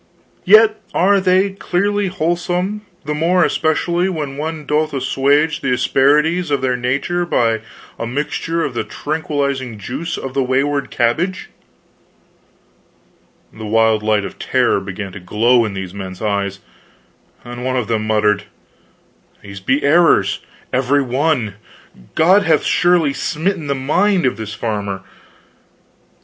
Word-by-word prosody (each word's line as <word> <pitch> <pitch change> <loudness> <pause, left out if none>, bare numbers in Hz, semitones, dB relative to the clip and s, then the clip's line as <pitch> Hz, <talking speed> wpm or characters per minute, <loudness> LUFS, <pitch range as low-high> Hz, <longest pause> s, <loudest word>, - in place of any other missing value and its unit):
" - - -37
yet 215 +2 +6
are 195 +3 +4
they 190 +1 +3
clearly 200 +2 -1
wholesome, 180 +3 -1 0.2
the 150 - -2
more 170 +4 +2
especially 170 +3 0
when 150 -6 -4
one 155 +1 -5
doth 150 +1 0
assuage 140 +3 +1
the 135 - -1
asperities 150 +7 +2
of 140 -2 0
their 125 -1 +1
nature 140 +8 -1
by 115 -9 +1 0.4
admixture 150 +7 -2
of 135 - -4
the 120 - -2
tranquilizing 140 -6 -3
juice 135 - -5
of 135 - -6
the 135 - +1
wayward 135 +1 0
cabbage 165 +11 -1 1.0
" - - -37
The 110 -1 -8
wild 110 0 +3
light 105 -1 +1
of - - -9
terror - - +1
began 95 0 -6
to 100 - -9
glow 115 +6 +2
in 105 -3 -5
these 95 -1 -6
men's 95 -2 -7
eyes, 100 -2 -2 0.8
and 120 0 -7
one 130 0 -1
of 120 -4 -1
them 110 -2 -1
muttered, 105 -1 +1 1.0
"These 100 -1 -9
be 130 +10 0
errors, 145 - +4 0.3
every 135 +2 +2
one 130 - 0 0.6
God 185 +6 +5
hath 160 -6 +2
surely 175 -5 +2
smitten 160 +1 -2
the 140 - 0
mind 175 +7 +1
of 130 - +1
this 110 0 -6
farmer." 100 -4 -3
140 Hz, 135 wpm, -18 LUFS, 110-165 Hz, 1.0 s, yet